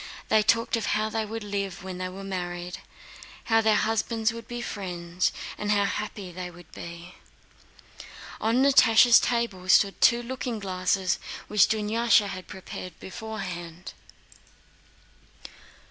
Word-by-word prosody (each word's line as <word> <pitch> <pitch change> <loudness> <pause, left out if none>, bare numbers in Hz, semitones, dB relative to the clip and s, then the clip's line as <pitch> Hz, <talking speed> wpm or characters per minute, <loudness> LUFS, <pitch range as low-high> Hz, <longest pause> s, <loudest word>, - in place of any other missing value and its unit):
They 215 - +5
talked 230 +3 +2
of 230 - -2
how 215 0 0
they 220 0 -1
would 225 +1 -5
live 200 -3 -4
when 185 -1 -6
they 185 0 -3
were 195 +2 -9
married, 180 -1 -5 0.6
how 225 -1 +3
their 220 -1 +3
husbands 225 0 0
would 230 0 -9
be 240 0 -5
friends, 180 -5 -2 0.3
and 210 - -3
how 205 -1 +3
happy 200 -2 -4
they 180 0 -6
would 175 -1 -15
be. 170 +1 -9 1.3
On 230 +4 +2
Natásha's 245 -4 +7
table 230 -7 -1
stood 195 +1 +4
two 240 -1 +5
looking 250 -1 -4
glasses 190 -1 0 0.3
which 210 -1 +5
Dunyásha 220 0 +2
had 185 -1 -7
prepared 185 -2 -9
beforehand. 185 -4 -7
205 Hz, 130 wpm, -26 LUFS, 185-225 Hz, 1.3 s, Natásha's